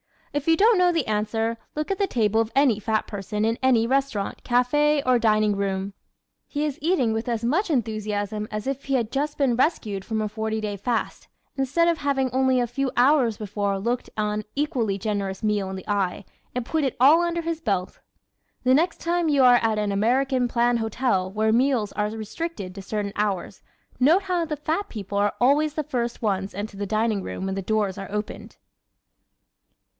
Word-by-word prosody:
If 290 +1 -2
you 325 - +5
don't 435 +3 +5
know 360 -1 +4
the 325 -5 0
answer, 225 +2 -1 0.2
look 305 +4 -2
at 390 - -2
the 400 - +2
table 220 - +1
of 225 0 -3
any 270 -6 +4
fat 215 0 0
person 210 +1 -3
in 225 +1 0
any 250 -4 +4
restaurant, 265 -5 -1
café 285 +4 +2
or 255 -1 +4
dining 215 -2 +3
room. 195 0 -2 0.5
He 295 0 -2
is 290 -3 -3
eating 305 -8 +2
with 225 +2 -3
as 230 -2 -2
much 330 - +1
enthusiasm 215 -5 -2
as 210 0 -4
if 275 0 -3
he 275 - 0
had 230 -4 -1
just 290 +2 -2
been 260 -5 +2
rescued 215 - 0
from 220 -1 -2
a 215 - -2
forty 220 +1 -2
day 210 -1 -3
fast, 230 +3 -2 0.3
instead 280 +5 +1
of 335 -1 0
having 270 -3 0
only 260 0 +2
a 245 - +2
few 260 +3 -2
hours 245 -3 +3
before 200 -1 -2
looked 235 +5 -2
an 210 0 -1
equally 260 -9 0
generous 200 -1 -3
meal 205 -3 0
in 190 - -5
the 190 - -9
eye 200 -2 -1 0.3
and 250 -2 -2
put 315 +2 0
it 265 - -1
all 295 +7 +7
under 340 0 -1
his 330 -1 -3
belt. 195 - -2 0.6
The 255 0 +4
next 330 +5 +1
time 345 -1 0
you 280 -3 +4
are 245 -1 +7
at 225 -1 +1
an 210 -1 0
American 250 +5 +1
plan 240 0 +2
hotel 225 -4 0
where 215 +2 +1
meals 240 -3 +2
are 210 0 -1
restricted 220 - -5
to 195 - -8
certain 200 +1 -3
hours 200 -4 -2 0.4
note 320 +10 +4
how 360 -3 0
the 305 -2 -4
fat 320 +8 -2
people 200 -2 -5
are 205 0 +2
always 290 +4 +3
the 310 - -1
first 240 -3 -3
ones 195 -2 -1
into 205 0 -5
the 200 0 -3
dining 215 0 0
room 190 - -5
when 190 0 -2
the 195 - -2
doors 205 -1 0
are 195 - -7
opened! 210 0 -5
230 Hz, 200 wpm, -24 LUFS, 210-275 Hz, 0.6 s, all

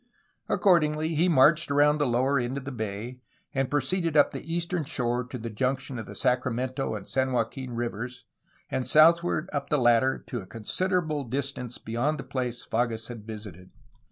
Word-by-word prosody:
Accordingly 155 -5 +3
he 165 +3 +2
marched 160 +2 +5
around 145 +1 +4
the 145 - +2
lower 130 +3 +2
end 125 +2 -2
of 135 - -6
the 140 - -4
bay, 110 +1 -5 0.3
and 135 -1 0
proceeded 160 +3 0
up 145 - +5
the 165 - -7
eastern 170 0 -1
shore 125 -5 -1
to 125 - -7
the 115 -1 -6
junction 130 +3 -2
of 110 - -7
the 100 - -9
Sacramento 125 +2 0
and 100 -2 -7
San 130 0 0
Joaquin 125 +2 -2
rivers 120 +1 -4 0.5
and 130 - -1
southward 165 +1 +5
up 140 -1 -2
the 150 - +3
latter 120 +1 +4
to 120 - -4
a 95 - -12
considerable 155 - -1
distance 130 -1 -4
beyond 120 +7 -1
the 135 - -6
place 125 -2 -3
Fages 115 -1 -1
had 115 -3 -9
visited. 105 -5 -9
130 Hz, 175 wpm, -27 LUFS, 120-150 Hz, 0.5 s, marched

